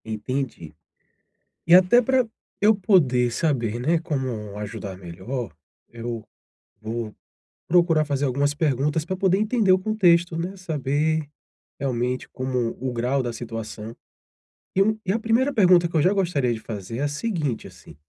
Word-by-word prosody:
Entendi. 110 - -4 0.9
E 170 - +6
até 185 +6 +7
para 255 0 +2 0.3
eu 215 +2 +5
poder 150 - +3
saber, 120 -5 0
né, 160 +7 +2
como 130 - -4
ajudar 105 -2 -6
melhor, 95 +7 -6 0.3
eu 115 -1 -6 0.6
vou 110 0 -5 0.5
procurar 165 -2 +4
fazer 145 -1 -1
algumas 140 +2 +1
perguntas 150 +1 0
para 185 +2 -3
poder 190 0 +2
entender 215 -2 +2
o 185 - +5
contexto, 175 -5 +2
né, 180 +4 -4
saber, 155 -2 -1 0.5
realmente, 125 -2 -2
como 125 -2 -2
o 130 0 -2
grau 125 +3 0
da 120 -1 -3
situação. 115 -1 -7 0.8
E, 195 - +4
hum, 215 +1 +1
e 190 - +1
a 230 - 0
1ª 235 +5 +1
pergunta 180 -6 +5
que 170 - -9
eu 155 - +4
já 180 +6 +4
gostaria 170 -11 +1
de 110 - -5
fazer 110 0 -6
é - - -2
a - - +2
seguinte, 150 - -2
assim: - - -15
145 Hz, 155 wpm, -24 LUFS, 120-180 Hz, 0.9 s, até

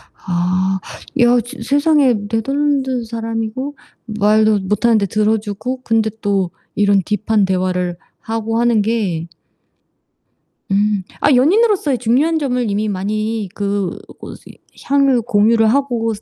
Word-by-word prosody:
아. 185 +1 -1 0.4
야 245 0 +5
저 245 +4 -10
세상에 285 -2 +3
네덜란드 265 +2 0
사람이고 230 +4 -4 0.3
말도 215 -1 +2
못하는데 210 +2 +1
들어 215 +3 +1
주고 220 +5 -5
근데 225 -2 +1
또 195 -3 0 0.2
이런 200 -1 +3
딥한 210 +1 0
대화를 180 -2 -1 0.2
하고 225 0 -3
하는 235 -2 +3
게 200 -7 -1 1.4
음. 205 -1 +1 0.2
아 290 - +3
연인으로서의 350 - +3
중요한 265 +8 +1
점을 250 -6 -1
이미 210 +2 -1
많이 215 +2 -2
그 200 -2 -2 0.2
고시 - - -11 0.3
향을 275 -3 +2
공유를 225 0 +3
하고 240 -2 0
스 210 - -10
220 Hz, 250 characters per minute, -17 LUFS, 205-250 Hz, 1.4 s, 야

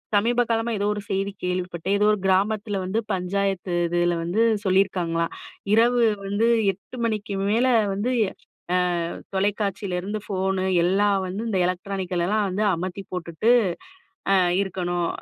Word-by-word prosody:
சமீப 235 +4 +3
காலமா 230 +1 0
ஏதோ 200 - -1
ஒரு 210 - -5
செய்தி 195 +1 -1
கேள்விப்பட்டேன். 180 +1 -1
ஏதோ 205 - +2
ஒரு 210 - 0
கிராமத்தில 205 +2 +1
வந்து 195 +5 0
பஞ்சாயத்து 190 0 -1
இதில 175 0 +1
வந்து 175 +7 0 0.2
சொல்லியிருக்காங்கலாம், 180 -3 +1 0.4
இரவு 240 +2 +4 0.3
வந்து 205 +3 +1 0.3
8:00 200 +6 -13
மணிக்கு 215 -2 -2 0.2
மேலே 240 +5 +3 0.2
வந்து, 205 +6 -1 0.6
ஆ - - +4 0.6
தொலைக்காட்சியிலருந்து 200 0 -1
ஃபோனு, 190 -1 -1 0.2
எல்லாம் 200 +3 +3
வந்து 190 +4 -4
இந்த 195 -4 0
எலக்ட்ரானிக்கலெல்லாம் 185 +2 -1
வந்து 195 +3 -1
அமத்தி 185 +3 -5
போட்டுட்டு, 180 +5 0 0.8
அ - - +6 0.3
இருக்கணும். 175 -2 -2
195 Hz, 125 wpm, -24 LUFS, 180-210 Hz, 0.8 s, அ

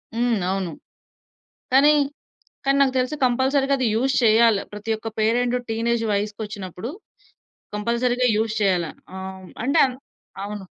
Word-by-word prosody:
హ్మ్. 240 +1 +1 0.2
అవును. 190 -3 -2 1.0
కానీ, 275 +3 +6 0.8
కానీ 275 0 +3
నాకు 265 -2 +3
తెలిసి 255 +4 0
కంపల్సరీ‌గా 265 +2 +2
అది 255 -2 +1
యూజ్ 265 +4 +1
చేయాలి. 225 -2 +5
ప్రతి 210 +2 -5
ఒక్క 220 - -8
పేరెంట్ 240 +3 +2
టీనేజ్ 230 +1 0
వయసుక్కొచ్చినప్పుడు 205 -1 -4 0.9
కంపల్సరీ‌గా 240 +4 +1
యూజ్ 220 0 0
చేయాల. 185 -4 +2 0.3
ఆహ్, 190 0 -6
హ్మ్, 185 - -13
అంటే 275 +3 +2
అంద్ 255 -1 -7 0.5
అవును. 205 -1 -6
230 Hz, 130 wpm, -23 LUFS, 205-250 Hz, 1.0 s, కానీ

